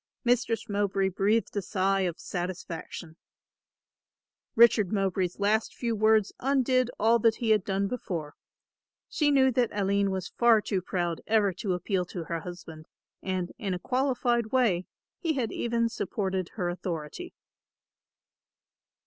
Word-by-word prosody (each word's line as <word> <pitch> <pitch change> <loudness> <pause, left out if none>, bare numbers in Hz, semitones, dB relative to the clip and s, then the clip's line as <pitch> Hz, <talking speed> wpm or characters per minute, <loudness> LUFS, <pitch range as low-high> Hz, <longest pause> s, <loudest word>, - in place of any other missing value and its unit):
Mistress 240 -2 +1
Mowbray 200 -1 0
breathed 205 +5 0
a 205 - 0
sigh 195 0 0
of 180 -3 -1
satisfaction. 175 -2 -6 1.4
Richard 220 -4 +5
Mowbray's 190 -3 -1
last 215 +2 +1
few 235 -2 -2
words 215 -1 +3
undid 255 -2 +2
all 230 +2 +4
that 225 0 +3
he 230 -2 0
had 210 -3 +4
done 195 0 -1
before. 170 -10 -5 0.7
She 300 -2 +1
knew 265 -2 +4
that 245 -1 +1
Aline 200 0 +1
was 190 -2 -3
far 235 -2 +6
too 200 -2 -2
proud 175 -2 -2
ever 210 -3 +3
to 190 +1 -2
appeal 180 +1 -1
to 175 -1 -6
her 165 0 -3
husband 160 -2 -10 0.3
and, 185 -2 -2
in 195 -6 -2
a - - -2
qualified 250 -1 0
way, 220 -8 +1 0.3
he 330 -3 0
had 250 -6 -2
even 230 0 0
supported 190 -4 -3
her 180 -5 -1
authority. 175 - -5
200 Hz, 140 wpm, -28 LUFS, 185-230 Hz, 1.4 s, far